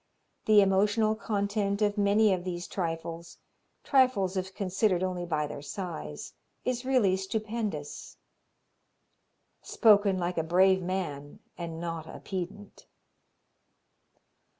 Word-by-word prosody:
The 215 Hz, -1 st, +7 dB
emotional 205 Hz, +3 st, +3 dB
content 205 Hz, -2 st, -1 dB
of 205 Hz, -1 st, +1 dB
many 205 Hz, 0 st, +4 dB
of 180 Hz, -1 st, -2 dB
these 175 Hz, -1 st, -4 dB
trifles 165 Hz, -1 st, -5 dB, 0.5 s
trifles 255 Hz, -9 st, +3 dB
if 190 Hz, 0 st, -3 dB
considered 190 Hz, -1 st, +1 dB
only 180 Hz, -1 st, -2 dB
by 155 Hz, -3 st, 0 dB
their 145 Hz, -1 st, -7 dB
size 140 Hz, -, -6 dB, 0.3 s
is 250 Hz, 0 st, -1 dB
really 250 Hz, -8 st, +3 dB
stupendous." 210 Hz, -5 st, -4 dB, 1.4 s
Spoken 205 Hz, -4 st, +4 dB
like 175 Hz, -1 st, -1 dB
a -, -, 0 dB
brave 185 Hz, +3 st, +4 dB
man 170 Hz, -6 st, -4 dB, 0.2 s
and 165 Hz, -2 st, -6 dB
not 165 Hz, -2 st, -5 dB
a -, -, -9 dB
pedant! 195 Hz, +2 st, -7 dB
190 Hz, 110 wpm, -29 LUFS, 175-205 Hz, 1.4 s, The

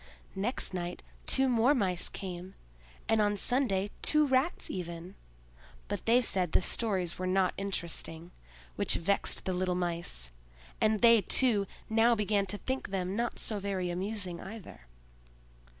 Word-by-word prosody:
Next 205 Hz, +1 st, -2 dB
night 175 Hz, -1 st, -4 dB, 0.2 s
two 265 Hz, 0 st, +4 dB
more 250 Hz, +3 st, +3 dB
Mice 185 Hz, -7 st, +1 dB
came, 185 Hz, 0 st, -7 dB, 0.5 s
and 225 Hz, -1 st, +3 dB
on 205 Hz, 0 st, +1 dB
Sunday 205 Hz, -4 st, +2 dB
two 305 Hz, 0 st, +3 dB
Rats, 270 Hz, +5 st, +1 dB
even; 170 Hz, 0 st, -6 dB, 0.7 s
but -, -, -5 dB
they 245 Hz, +2 st, +5 dB
said 180 Hz, -7 st, +1 dB
the -, -, +4 dB
stories 185 Hz, -7 st, 0 dB
were 185 Hz, -, -2 dB
not 185 Hz, -1 st, +2 dB
interesting, 170 Hz, -3 st, -3 dB, 0.5 s
which -, -, +1 dB
vexed 200 Hz, +4 st, +1 dB
the 185 Hz, -, -1 dB
little 180 Hz, 0 st, 0 dB
Mice; 170 Hz, -, -1 dB, 0.5 s
and 215 Hz, -1 st, +2 dB
they, 230 Hz, -2 st, +7 dB
too, 210 Hz, -1 st, +3 dB, 0.2 s
now 225 Hz, +2 st, +4 dB
began 205 Hz, -2 st, 0 dB
to 205 Hz, -, -1 dB
think 260 Hz, +2 st, -4 dB
them 190 Hz, 0 st, -2 dB
not 235 Hz, +2 st, -2 dB
so 215 Hz, -2 st, -1 dB
very 190 Hz, -3 st, -2 dB
amusing 185 Hz, -1 st, -4 dB
either. 195 Hz, -, -10 dB
195 Hz, 145 wpm, -30 LUFS, 180-225 Hz, 0.7 s, they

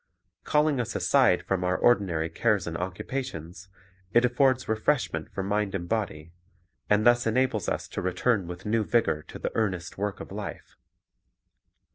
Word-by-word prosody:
Calling 150 Hz, -2 st, +2 dB
us 120 Hz, -, -3 dB
aside -, -, +3 dB
from 95 Hz, -2 st, -1 dB
our 90 Hz, 0 st, +1 dB
ordinary 95 Hz, -9 st, +2 dB
cares 100 Hz, +3 st, +1 dB
and 85 Hz, -, -4 dB
occupations, 90 Hz, -, -5 dB, 0.4 s
it 120 Hz, +1 st, +5 dB
affords 130 Hz, +1 st, +2 dB
refreshment 110 Hz, +6 st, 0 dB
for 95 Hz, -, -3 dB
mind 100 Hz, 0 st, -1 dB
and 85 Hz, -2 st, -4 dB
body, 85 Hz, -8 st, -3 dB, 0.6 s
and 105 Hz, +1 st, +3 dB
thus 120 Hz, 0 st, +4 dB
enables 120 Hz, -2 st, +1 dB
us -, -, -3 dB
to -, -, -4 dB
return 90 Hz, +2 st, 0 dB
with 90 Hz, +1 st, -8 dB
new 110 Hz, +1 st, +1 dB
vigor 110 Hz, -9 st, +1 dB
to -, -, -9 dB
the -, -, -3 dB
earnest 95 Hz, -5 st, -2 dB
work 105 Hz, 0 st, -2 dB
of -, -, -9 dB
life. -, -, -7 dB
105 Hz, 155 wpm, -27 LUFS, 90-120 Hz, 0.6 s, it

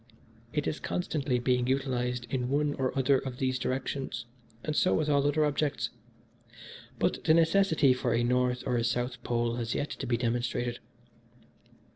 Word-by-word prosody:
It 150 Hz, -1 st, -1 dB
is 155 Hz, -, -2 dB
constantly 145 Hz, -7 st, -1 dB
being 125 Hz, 0 st, +1 dB
utilised 125 Hz, -2 st, -1 dB
in 125 Hz, -2 st, -1 dB
one 145 Hz, +1 st, +1 dB
or 130 Hz, -2 st, -1 dB
other 135 Hz, 0 st, +4 dB
of 130 Hz, -2 st, -6 dB
these 130 Hz, -1 st, 0 dB
directions; 130 Hz, 0 st, -3 dB, 0.4 s
and 155 Hz, -, -2 dB
so 185 Hz, -, +3 dB
with 155 Hz, -1 st, 0 dB
all 140 Hz, -1 st, +3 dB
other 150 Hz, +1 st, +2 dB
objects. 150 Hz, 0 st, -1 dB, 1.1 s
But -, -, 0 dB
the 155 Hz, -, +6 dB
necessity 165 Hz, -4 st, +4 dB
for 125 Hz, -1 st, -1 dB
a 120 Hz, -, +2 dB
North 125 Hz, 0 st, +1 dB
or 125 Hz, -2 st, +1 dB
a 115 Hz, -, +1 dB
South 120 Hz, +2 st, -1 dB
Pole 120 Hz, 0 st, -1 dB
has 115 Hz, -1 st, -2 dB
yet 145 Hz, -, -2 dB
to -, -, -5 dB
be 120 Hz, -1 st, +1 dB
demonstrated. 120 Hz, 0 st, -1 dB
130 Hz, 165 wpm, -29 LUFS, 125-145 Hz, 1.1 s, the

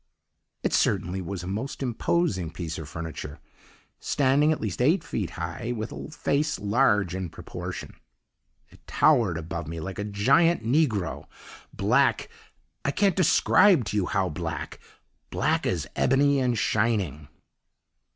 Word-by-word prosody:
"It -, -, 0 dB
certainly 95 Hz, +2 st, +1 dB
was 90 Hz, 0 st, -5 dB
a -, -, -6 dB
most 110 Hz, +9 st, -4 dB
imposing 120 Hz, -, 0 dB
piece 80 Hz, -1 st, -6 dB
of 75 Hz, -2 st, -8 dB
furniture. 75 Hz, -2 st, -7 dB, 0.6 s
Standing 145 Hz, +2 st, +2 dB
at 155 Hz, -, -1 dB
least 110 Hz, 0 st, -3 dB
eight 160 Hz, +7 st, +3 dB
feet 105 Hz, -, -3 dB
high, 85 Hz, +8 st, -4 dB
with 110 Hz, +1 st, -4 dB
a -, -, -7 dB
face 150 Hz, -1 st, -1 dB
large 105 Hz, -4 st, +2 dB
in 95 Hz, -2 st, -4 dB
proportion, -, -, -7 dB, 0.8 s
it -, -, -18 dB
towered 120 Hz, -, +3 dB
above 80 Hz, 0 st, -5 dB
me 80 Hz, +1 st, -5 dB
like 95 Hz, +4 st, -6 dB
a -, -, -1 dB
giant 135 Hz, +11 st, +3 dB
negro 115 Hz, -, 0 dB, 0.4 s
black -, -, +2 dB, 0.5 s
I -, -, 0 dB
can't 195 Hz, +5 st, +2 dB
describe 165 Hz, -, +4 dB
to 105 Hz, -, -4 dB
you 95 Hz, -, +1 dB
how 95 Hz, -1 st, 0 dB
black 85 Hz, +2 st, -5 dB, 0.5 s
black -, -, 0 dB
as 85 Hz, -5 st, -1 dB
ebony 140 Hz, +1 st, +3 dB
and 125 Hz, -3 st, +1 dB
shining. 100 Hz, -, 0 dB
105 Hz, 140 wpm, -26 LUFS, 85-140 Hz, 0.8 s, describe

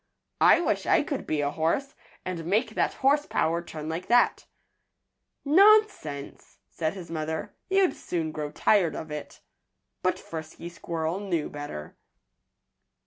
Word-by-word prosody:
"I -, -, +7 dB
wish -, -, -1 dB
I -, -, +4 dB
could -, -, -4 dB
be 155 Hz, -1 st, 0 dB
a 145 Hz, 0 st, 0 dB
horse, 165 Hz, -, -1 dB, 0.3 s
and 180 Hz, -3 st, -4 dB
make 210 Hz, +8 st, +1 dB
that -, -, 0 dB
horse 290 Hz, +2 st, +4 dB
power 170 Hz, +2 st, 0 dB
turn 155 Hz, -3 st, -8 dB
like 165 Hz, +3 st, -4 dB
that." 240 Hz, +1 st, +3 dB, 1.0 s
"Nonsense!" 375 Hz, -, +3 dB
said 160 Hz, +2 st, -2 dB
his 175 Hz, -4 st, -9 dB
mother. 160 Hz, +5 st, -3 dB, 0.2 s
"You'd 385 Hz, -1 st, +3 dB
soon 165 Hz, -3 st, -3 dB
grow 150 Hz, -1 st, -4 dB
tired 180 Hz, -6 st, +2 dB
of 160 Hz, -, -7 dB
it." 150 Hz, -1 st, -7 dB, 0.6 s
But -, -, +1 dB
Frisky 160 Hz, +1 st, -8 dB
Squirrel 170 Hz, +1 st, -3 dB
knew 175 Hz, -7 st, -2 dB
better. 145 Hz, -, -7 dB
165 Hz, 140 wpm, -27 LUFS, 155-210 Hz, 1.0 s, I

